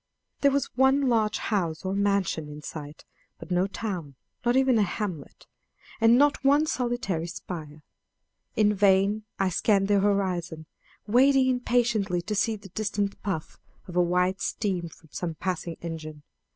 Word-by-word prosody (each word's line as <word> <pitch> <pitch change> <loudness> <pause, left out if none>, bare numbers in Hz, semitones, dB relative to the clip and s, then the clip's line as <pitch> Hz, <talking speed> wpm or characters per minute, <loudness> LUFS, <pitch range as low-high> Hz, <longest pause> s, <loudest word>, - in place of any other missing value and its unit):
There 280 - +4
was 280 0 -1
one 265 +1 +4
large 220 -3 +2
house 175 -6 -2
or 190 - -1
mansion 200 -6 0
in 150 0 -9
sight, 150 -1 -8 0.3
but - - -11
no 180 +2 +2
town, 185 -9 -5 0.3
nor 240 +1 +3
even 265 -3 +4
a - - +4
hamlet, 185 -6 -4 0.5
and 225 +1 +6
not 290 +1 +3
one 285 +3 +4
solitary 240 - -2
spire. 160 -4 -8 0.7
In 210 -1 +3
vain 200 +1 +3
I 195 -1 +1
scanned 195 +2 +2
the 205 -1 +4
horizon, 185 -5 -1 0.4
waiting 260 +4 +4
impatiently 235 -7 +1
to 210 - -3
see 220 +2 +1
the 200 -2 -12
distant 200 0 -2
puff 185 -6 -4 0.3
of 180 - -9
white 180 +2 +2
steam 185 -6 -2
from 160 0 -19
some 165 0 -4
passing 175 -1 -3
engine. 155 -3 -7
195 Hz, 150 wpm, -27 LUFS, 175-225 Hz, 0.7 s, and